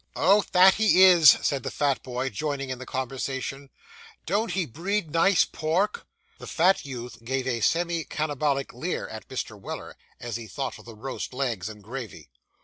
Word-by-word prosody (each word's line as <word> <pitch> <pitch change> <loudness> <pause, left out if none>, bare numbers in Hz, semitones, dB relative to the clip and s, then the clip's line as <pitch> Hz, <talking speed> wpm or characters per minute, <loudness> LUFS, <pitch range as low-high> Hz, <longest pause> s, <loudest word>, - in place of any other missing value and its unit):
Oh, 200 +2 +4
that 185 +1 +7
he 210 -3 +5
is!' 175 -6 +8
said 140 -2 0
the - - -4
fat 140 -2 0
boy, 125 +1 -3
joining 140 +3 -3
in 130 - -5
the 130 - -9
conversation; 135 +1 -4 0.6
'don't 215 +4 0
he 185 -3 0
breed 170 - -3
nice 170 +2 +4
pork!' 175 +7 -1 0.3
The - - -9
fat 180 +4 +3
youth 120 -4 -8
gave 130 +2 -2
a 120 -3 -1
semi 170 +4 +1
cannibalic 145 -3 -2
leer 160 +9 -3
at 110 - -9
Mr. 115 -5 -5
Weller, - - -7 0.2
as 120 -2 -4
he 115 -1 -9
thought 135 +3 -5
of - - -15
the 115 -1 -11
roast 130 +2 -6
legs 115 -8 -2
and 105 -1 -11
gravy. 115 - -8
135 Hz, 175 wpm, -26 LUFS, 125-170 Hz, 0.6 s, is